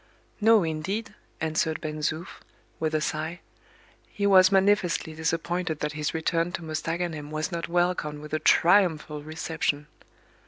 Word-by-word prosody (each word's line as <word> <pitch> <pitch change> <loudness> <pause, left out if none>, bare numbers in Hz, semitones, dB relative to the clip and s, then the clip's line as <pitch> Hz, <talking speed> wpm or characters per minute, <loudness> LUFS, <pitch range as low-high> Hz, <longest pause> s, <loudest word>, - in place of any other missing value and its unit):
"No, 220 -2 +5
indeed," 165 +8 -3 0.3
answered 160 0 0
Ben 155 -1 -5
Zoof, 155 +3 -3 0.4
with 155 -1 -1
a 155 - +1
sigh; 160 +3 -3 0.7
he 200 - -3
was 185 -1 +7
manifestly 195 -4 +2
disappointed 165 +1 -2
that 150 - -1
his 150 0 -2
return 165 +1 0
to 170 - -4
Mostaganem 160 -1 -3
was 155 +4 -3
not 170 -1 -3
welcomed 175 -4 0
with 150 0 -10
a 155 - +1
triumphal 160 -3 +3
reception. 155 -1 -2
160 Hz, 135 wpm, -26 LUFS, 155-175 Hz, 0.7 s, was